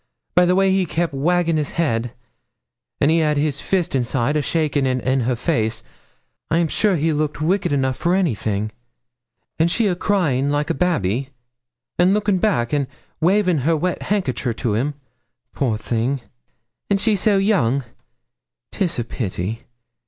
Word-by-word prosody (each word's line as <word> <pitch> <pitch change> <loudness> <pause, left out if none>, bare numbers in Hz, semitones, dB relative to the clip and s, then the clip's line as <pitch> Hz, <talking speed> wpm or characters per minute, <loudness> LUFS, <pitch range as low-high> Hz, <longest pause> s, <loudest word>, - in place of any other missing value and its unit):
By 180 0 +5
the 180 - +3
way 195 0 +3
he 190 -1 +1
kep' 165 0 -1
waggin' 165 +3 +1
his 150 -2 -2
head 120 -8 0 0.9
an' 145 - +3
he 165 +1 +3
had 150 -2 +1
his 145 -1 0
fist 185 -3 0
inside, 130 +2 0
a 150 - +2
shakin' 145 -2 0
in 130 +1 0
her 125 0 0
face 115 -4 -1 0.7
I'm 165 0 +2
sure 205 +3 +2
he 160 0 +1
looked 150 0 -1
wicked 185 +5 +1
enough 130 -2 0
for 175 +2 +1
anything; 110 - -1 0.9
an' 165 - +4
she 225 +6 +1
a 195 - +2
crying 155 -9 +1
like 145 +2 0
a - - +1
babby, 135 - 0 0.7
an' 180 +3 +4
lookin' 210 -3 +1
back, 160 - +1
an' 140 -2 +1 0.3
wavin' 180 -1 +3
her 160 +5 +1
wet 180 +3 -2
hankicher 140 - -1
to 115 -3 -1
him 135 +7 -1 0.6
poor 120 -6 0
thing! 120 +4 -1 0.7
and 200 -1 +2
she 215 +1 +2
so 200 +1 +2
young! 140 - +2 0.9
'Tis 175 -4 -1
a 120 - 0
pity. 110 -1 -4
150 Hz, 160 wpm, -21 LUFS, 130-180 Hz, 0.9 s, By